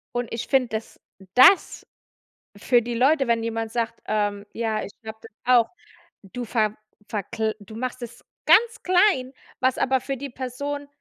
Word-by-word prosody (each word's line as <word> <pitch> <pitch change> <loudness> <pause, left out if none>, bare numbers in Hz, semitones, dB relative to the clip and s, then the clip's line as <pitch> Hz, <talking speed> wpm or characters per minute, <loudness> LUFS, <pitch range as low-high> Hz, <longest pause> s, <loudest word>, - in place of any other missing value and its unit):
Und 240 -1 -2
ich 230 - -4
finde, 265 -3 +2
dass 220 - -12 0.4
das 265 - +5 0.7
für 240 +4 +3
die 240 +1 -4
Leute, 270 +4 +3
wenn 230 -1 +1
jemand 225 -1 -3
sagt: 230 -1 -2
„Ähm, 205 -1 -1
ja, 220 -2 -1
ich 200 - -9
glaube 220 0 -8
das 225 - -13
auch, 245 -2 +4 0.5
du 240 +6 -7
ver 215 -2 0 0.3
verkl 220 +1 -3
du 205 +1 -13
machst 255 +1 -4
das 240 0 -9 0.2
ganz 455 -1 +5
klein." 360 -8 +3 0.3
Was 260 0 +1
aber 265 0 +1
für 275 +2 -4
die 275 +2 -7
Person 280 +3 -5
240 Hz, 165 wpm, -24 LUFS, 220-265 Hz, 0.7 s, das